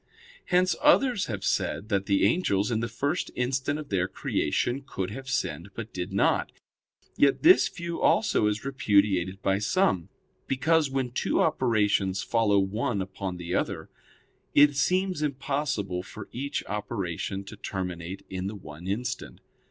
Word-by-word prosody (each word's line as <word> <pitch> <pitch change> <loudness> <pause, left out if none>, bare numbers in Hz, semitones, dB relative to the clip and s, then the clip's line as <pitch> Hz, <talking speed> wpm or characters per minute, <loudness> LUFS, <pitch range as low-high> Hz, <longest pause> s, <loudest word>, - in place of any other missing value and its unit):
Hence 185 +1 +3
others 270 -7 +4
have 105 -4 -4
said 105 - -1
that 100 -2 0
the 100 -1 +3
angels, 105 - +1
in 110 - +1
the 115 - -1
first 140 +8 -2
instant 130 +3 0
of 155 -2 -8
their 90 -2 +1
creation, 120 - -1
could 95 -7 -4
have 135 +4 -7
sinned, 85 - -2
but 115 -1 -7
did 90 -1 -4
not. - - +2 0.7
Yet 140 -1 +3
this 360 +4 +7
view 170 -1 -5
also 205 - +3
is 105 +3 -2
repudiated 100 -7 +1
by 95 0 +2
some, 105 - +1 0.4
because, 150 +3 +2
when 135 -2 -2
two - - 0
operations 105 -5 +2
follow 110 -3 +2
one 100 +3 0
upon 95 -1 -4
the 90 0 -5
other, - - -2 0.6
it 145 0 +6
seems 185 +3 +1
impossible 135 -9 -1
for 100 +3 -10
each 140 +4 -3
operation 100 -2 -3
to 100 +2 -10
terminate 95 -1 -5
in 95 0 -4
the 105 - -5
one 85 -2 -10
instant. 125 +6 -3
105 Hz, 150 wpm, -27 LUFS, 95-140 Hz, 0.7 s, this